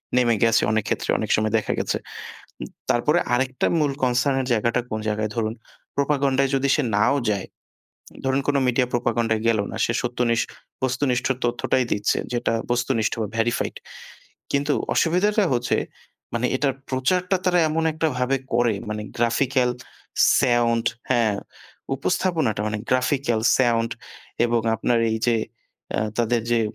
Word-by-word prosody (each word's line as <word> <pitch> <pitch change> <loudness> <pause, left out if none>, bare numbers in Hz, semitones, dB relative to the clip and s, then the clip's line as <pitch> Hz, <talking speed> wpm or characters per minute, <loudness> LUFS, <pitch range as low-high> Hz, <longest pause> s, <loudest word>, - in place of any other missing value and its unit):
নেমে 120 -2 +3
গেছে 115 -1 +4
অনেক 110 -1 +1
ক্ষেত্রে, - - -2
অনেক - - -3
সময় 110 +1 0
দেখা 110 - -2
গেছে। - - -1 0.9
তারপরে - - +3
আরেকটা 130 +1 0
মূল 145 -2 +2
কনসার্ন 130 +2 +2
এর - - -4
জায়গাটা 115 +2 +1
কোন 110 - -3
জায়গায়, 105 0 -1
ধরুন 110 -1 -1 0.4
প্রোপাগান্ডায় 140 -1 +1
যদি 135 +1 +1
সে 150 - +1
নাও 105 +7 +3 0.2
যায়, 100 -2 -3 0.8
ধরুন 135 +1 +1
কোন 145 - +2
মিডিয়া 125 0 +2
প্রোপাগান্ডায় 115 -2 0
গেল 110 -2 +3
না। - - -6
সে 115 - -1
সত্যনিষ্ঠ, 120 -2 0 0.4
বস্তুনিষ্ঠ 125 -1 0 0.2
তথ্যটাই 125 +1 +1
দিচ্ছে; 105 +1 +1 0.2
যেটা 120 -1 0 0.2
বস্তুনিষ্ঠ, 120 -2 +1 0.2
ভেরিফাইড। 115 +1 0 0.8
কিন্তু 145 +1 +1 0.2
অসুবিধাটা 205 +5 +2
হচ্ছে 120 0 +1 0.6
মানে 120 +2 +1
এটার 135 -1 +1 0.2
প্রচারটা 180 +9 +1
তারা 180 -1 +3
এমন 160 +1 0
একটাভাবে 135 -4 0 0.2
করে 120 -2 +3 0.2
মানে 105 0 -3 0.2
গ্রাফিক্যাল, 125 +2 +2 0.7
সাউন্ড, 120 -2 +2 0.2
হ্যাঁ, 115 -5 +2 0.6
উপস্থাপনাটা; 155 - 0
মানে 105 0 -2
গ্রাফিক্যাল, 130 -2 +1 0.2
সাউন্ড 115 -2 +2 0.5
এবং 120 -1 +1
আপনার 115 +1 +1
এই 110 - 0
যে 120 - +4 0.6
আ - - +1 0.2
তাদের 120 0 +1
যে 120 - +3
125 Hz, 135 wpm, -23 LUFS, 115-135 Hz, 0.9 s, গেছে